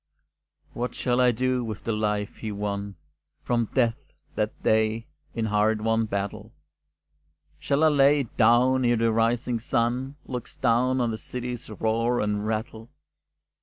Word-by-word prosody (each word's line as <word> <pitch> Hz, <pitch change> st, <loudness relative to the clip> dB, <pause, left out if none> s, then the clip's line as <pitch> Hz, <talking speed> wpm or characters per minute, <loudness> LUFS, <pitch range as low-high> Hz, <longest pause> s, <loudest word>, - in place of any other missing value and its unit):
What 120 Hz, 0 st, -3 dB
shall 125 Hz, 0 st, +1 dB
I 125 Hz, -, +5 dB
do 125 Hz, +1 st, 0 dB
with 110 Hz, -3 st, -6 dB
the 115 Hz, -, -1 dB
life 105 Hz, -1 st, -1 dB
he 110 Hz, -, -5 dB
won, 100 Hz, -1 st, -4 dB, 0.5 s
From 120 Hz, -2 st, 0 dB
death 125 Hz, +1 st, 0 dB, 0.2 s
that 105 Hz, 0 st, -3 dB
day, 110 Hz, +1 st, +2 dB, 0.3 s
in 115 Hz, -, -1 dB
a -, -, -2 dB
hard 105 Hz, +1 st, +2 dB
won 115 Hz, 0 st, +1 dB
battle? 100 Hz, -1 st, -4 dB, 1.1 s
Shall 140 Hz, +2 st, +1 dB
I 160 Hz, -, +6 dB
lay 145 Hz, 0 st, +4 dB
it 120 Hz, -, -9 dB
down 125 Hz, +3 st, +4 dB
e'er 120 Hz, 0 st, +3 dB
the 115 Hz, 0 st, +2 dB
rising 115 Hz, +1 st, +1 dB
sun 125 Hz, +3 st, -1 dB
Looks 125 Hz, -2 st, -7 dB
down 130 Hz, +1 st, +2 dB
on 120 Hz, -1 st, +1 dB
the 110 Hz, -, -5 dB
city's 125 Hz, -1 st, -6 dB
roar 115 Hz, +3 st, 0 dB
and 105 Hz, 0 st, -1 dB
rattle? 110 Hz, +1 st, -4 dB
115 Hz, 155 wpm, -26 LUFS, 110-125 Hz, 1.1 s, I